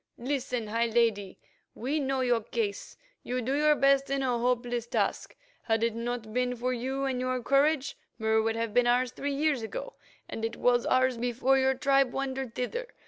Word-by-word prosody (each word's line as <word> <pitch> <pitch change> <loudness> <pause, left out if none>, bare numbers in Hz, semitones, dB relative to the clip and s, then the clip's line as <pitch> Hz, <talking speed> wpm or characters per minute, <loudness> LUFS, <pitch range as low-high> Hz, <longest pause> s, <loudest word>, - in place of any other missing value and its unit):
Listen, 250 -2 -2
high 230 +2 0
Lady; 220 -4 +1 0.4
we 275 +6 -1
know 270 -2 -1
your 245 -2 +2
case. 210 -2 -4 0.2
You 250 +1 -3
do 255 +2 -2
your 300 +1 +4
best 275 -1 +3
in 275 0 0
a 245 -2 0
hopeless 240 -1 -1
task. - - -1 0.3
Had 225 -1 0
it 230 -1 +1
not 230 -1 -4
been 250 0 0
for 250 +2 -1
you 265 +3 -2
and 260 -2 -1
your 255 -1 -1
courage, 280 +1 +2 0.2
Mur 220 -1 +2
would 225 0 0
have 230 -2 -2
been 245 +1 +3
ours 245 0 +2
three 280 +2 -3
years 290 -3 +1
ago, - - -6 0.3
and 225 - -6
it 225 +1 -2
was 245 -1 +2
ours 255 -2 +2
before 250 +3 +2
your 265 0 +2
tribe 275 -1 +2
wandered 265 -3 -3
thither. 480 - -3
250 Hz, 190 wpm, -29 LUFS, 235-270 Hz, 0.4 s, your